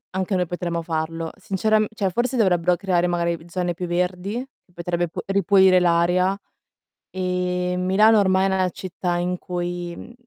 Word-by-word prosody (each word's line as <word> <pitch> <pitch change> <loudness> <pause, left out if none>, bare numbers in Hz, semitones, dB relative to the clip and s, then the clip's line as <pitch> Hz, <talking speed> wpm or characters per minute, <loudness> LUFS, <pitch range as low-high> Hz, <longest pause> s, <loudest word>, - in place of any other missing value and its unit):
anche 190 +1 -1
noi 180 -1 +1
potremmo 175 -1 -3
farlo. 165 0 -3
Sinceramen 215 +2 +1
cioè, 195 -3 -1
forse 245 +6 -1
dovrebbero 180 -5 +3
creare 180 -3 +1
magari 170 -1 -1
zone 175 0 -2
più 180 +1 -5
verdi, 180 +3 -1 0.3
che - - -30
potrebbe 175 0 -2
p - - -19
ripulire 195 -1 +4
l'aria, 180 +2 +2 0.7
e 180 -1 -1
Milano 205 +4 +4
ormai 190 -1 +3
è 195 - +1
una 185 -1 +1
città 180 0 -4
in 180 +1 -1
cui 175 -1 -4
mh, 235 - -11
180 Hz, 160 wpm, -22 LUFS, 175-190 Hz, 0.7 s, ripulire